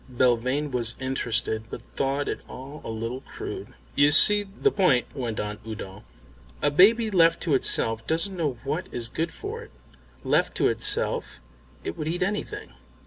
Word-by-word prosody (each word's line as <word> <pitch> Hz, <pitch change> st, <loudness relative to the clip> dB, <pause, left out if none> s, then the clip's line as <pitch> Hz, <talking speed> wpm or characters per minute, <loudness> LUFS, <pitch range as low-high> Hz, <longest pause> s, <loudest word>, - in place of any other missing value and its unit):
Belvane 130 Hz, +4 st, +1 dB
was 115 Hz, -2 st, +1 dB
interested, 120 Hz, -4 st, -1 dB
but 120 Hz, -, -7 dB
thought 140 Hz, +1 st, 0 dB
it -, -, -2 dB
all 140 Hz, +4 st, -9 dB
a -, -, -6 dB
little 115 Hz, +3 st, -4 dB
crude. -, -, -8 dB, 0.2 s
"You 145 Hz, +1 st, +5 dB
see 205 Hz, +7 st, +8 dB
the 205 Hz, -, 0 dB
point," 135 Hz, -, +3 dB
went 120 Hz, -5 st, -3 dB
on 105 Hz, 0 st, -4 dB
Udo. 105 Hz, -3 st, -8 dB, 0.6 s
"A 145 Hz, -, +3 dB
baby 220 Hz, +8 st, +5 dB
left 165 Hz, -3 st, +4 dB
to 160 Hz, -, 0 dB
itself 115 Hz, -3 st, 0 dB
doesn't 165 Hz, +5 st, -1 dB
know 150 Hz, -8 st, -1 dB
what 165 Hz, +7 st, -2 dB
is 120 Hz, -1 st, -4 dB
good 165 Hz, +7 st, -3 dB
for -, -, -6 dB
it. -, -, -12 dB, 0.5 s
Left -, -, +1 dB
to -, -, +3 dB
itself -, -, -1 dB, 0.4 s
it 85 Hz, -, -4 dB
would 150 Hz, -, -3 dB
eat 175 Hz, +3 st, 0 dB
anything. 210 Hz, -, -4 dB
140 Hz, 165 wpm, -26 LUFS, 115-170 Hz, 0.6 s, see